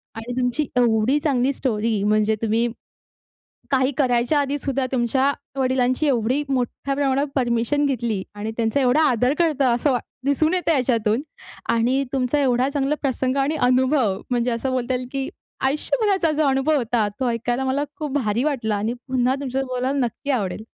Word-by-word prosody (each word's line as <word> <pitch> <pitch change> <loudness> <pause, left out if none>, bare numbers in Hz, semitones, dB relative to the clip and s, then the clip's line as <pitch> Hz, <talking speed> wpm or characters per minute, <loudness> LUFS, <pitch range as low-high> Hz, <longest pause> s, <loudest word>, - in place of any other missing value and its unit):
आणि 230 +2 -6
तुमची 250 +4 0
एवढी 240 +3 +3
चांगली 275 -3 +1
स्टोरी 225 -5 -1
म्हणजे 215 +1 +2
तुम्ही, 225 +1 +1 1.0
काही 260 0 +2
करायच्या 250 +1 +2
आधी 285 0 0
सुद्धा 270 -1 -1
तुमच्या 260 +2 +2 0.3
वडिलांची 255 +2 +1
एवढी 255 +2 +1
मोठ्या 265 +1 -1
प्रमाणावर 275 0 +1
परमिशन 245 +3 +1
घेतली 235 -7 -1
आणि 210 +2 -4
त्यांचा 225 +3 +1
एवढा 260 +4 +3
आदर 250 +2 +2
करतो 310 -5 +2
असं 275 +4 +1
वा 245 - +1 0.3
दिसून 310 +4 +2
येतं 360 -2 +1
याच्यातून 235 -3 +1 0.5
आणि 250 +4 +2
तुमचा 265 +2 +1
एवढा 255 0 +2
चांगला 280 0 0
प्रसंग 260 -1 -1
आणि 275 +3 +1
अनुभव 255 -6 +2
म्हणजे 245 -1 0
असं 235 +3 -2
बोलता 255 0 -1
येईल 250 0 -4
की 275 0 -3 0.4
आयुष्यभराचा 380 - +1
जो 310 - +3
अनुभव 270 +3 +2
होता 235 -4 0
तो 255 -2 +1
ऐकायला 240 +2 -1
मला 265 +2 0
खूप 300 -5 -4
भारी 230 -2 0
वाटला 245 -8 0
आणि 215 +3 -1
पुन्हा 255 0 +1
तुमच्या 270 -1 -2
बरोबर 255 -1 -4
बोलायला 270 +3 0
नक्की 280 +4 -6
आवडेल. 215 -5 -2
255 Hz, 165 wpm, -22 LUFS, 235-275 Hz, 1.0 s, एवढी